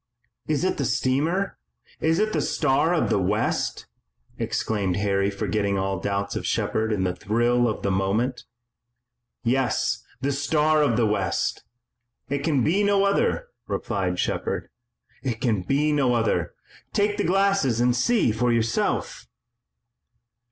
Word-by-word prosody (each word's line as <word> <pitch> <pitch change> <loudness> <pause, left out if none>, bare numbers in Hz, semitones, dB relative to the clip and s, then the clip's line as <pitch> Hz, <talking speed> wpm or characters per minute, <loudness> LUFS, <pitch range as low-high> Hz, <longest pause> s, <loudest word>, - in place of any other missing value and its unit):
"Is - - 0
it - - 0
the - - -1
steamer? 160 +10 0 0.4
Is 160 +1 +2
it 215 +2 +1
the 155 - +1
Star 140 +4 +1
of 175 - +1
the - - +3
West?" 105 +4 -1 0.5
exclaimed 100 -5 -1
Harry 100 -1 +1
forgetting 100 0 -1
all 95 -1 -1
doubts 100 +1 -2
of - - -3
Shepard 110 0 0
in 100 -3 0
the 90 -1 -1
thrill 120 +3 +1
of 110 - -4
the 100 - +1
moment. 105 +7 0 1.0
"Yes, 130 +1 0 0.2
the 140 +3 0
Star 150 +2 +2
of 130 -7 +2
the 120 - +3
West! 100 -4 -1 0.6
It 140 +1 0
can 140 -3 +1
be 185 - +2
no 200 -1 +3
other!" 340 - +1 0.2
replied 95 -5 -2
Shepard. - - -2 0.5
"It 120 -4 -3
can 110 -6 +1
be 145 +9 +1
no 135 -5 +2
other! 115 -1 0 0.4
Take 205 0 +1
the 205 - 0
glasses 195 - +2
and 120 0 +3
see 205 - +2
for 120 +3 +1
yourself!" 115 -1 -1
120 Hz, 145 wpm, -24 LUFS, 105-155 Hz, 1.0 s, the